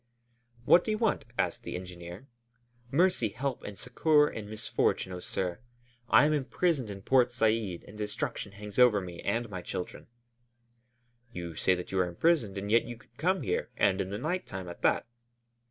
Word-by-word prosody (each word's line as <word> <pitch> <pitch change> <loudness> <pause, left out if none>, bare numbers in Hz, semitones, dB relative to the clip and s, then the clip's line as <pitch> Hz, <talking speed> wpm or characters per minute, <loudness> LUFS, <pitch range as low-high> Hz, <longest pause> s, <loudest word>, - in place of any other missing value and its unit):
"What 175 - +7
do - - -5
you 215 - +1
want?" 225 -2 +1
asked - - 0
the - - -6
engineer. 90 +4 -8 0.6
"Mercy, 160 - +3
help, 130 +4 -3
and 105 -1 -7
succor 150 +4 +3
in 105 -6 -6
misfortune, 110 -3 -1
oh, 90 - -5
sir! 90 0 -3 0.5
I - - +7
am 155 - +3
imprisoned 145 -2 0
in 100 -1 -7
Port 125 0 +4
Said 110 -6 0
and 105 - -12
destruction 105 0 -3
hangs 105 +2 -6
over 120 -5 +6
me 90 -2 -7
and 115 +4 -1
my 95 -4 -6
children." 90 - -6 1.3
"You 85 -5 -6
say 95 +3 +3
that 90 - -7
you 95 - 0
are 90 - +3
imprisoned, 110 - +1
and 100 +1 -3
yet 115 - +5
you 120 0 -7
could 130 - -24
come 185 +4 +1
here, 90 - -1
and 95 0 +3
in 95 - -3
the 100 - -3
night 180 +8 -2
time 95 -1 -6
at 85 - -9
that." - - +2
105 Hz, 185 wpm, -30 LUFS, 95-135 Hz, 1.3 s, What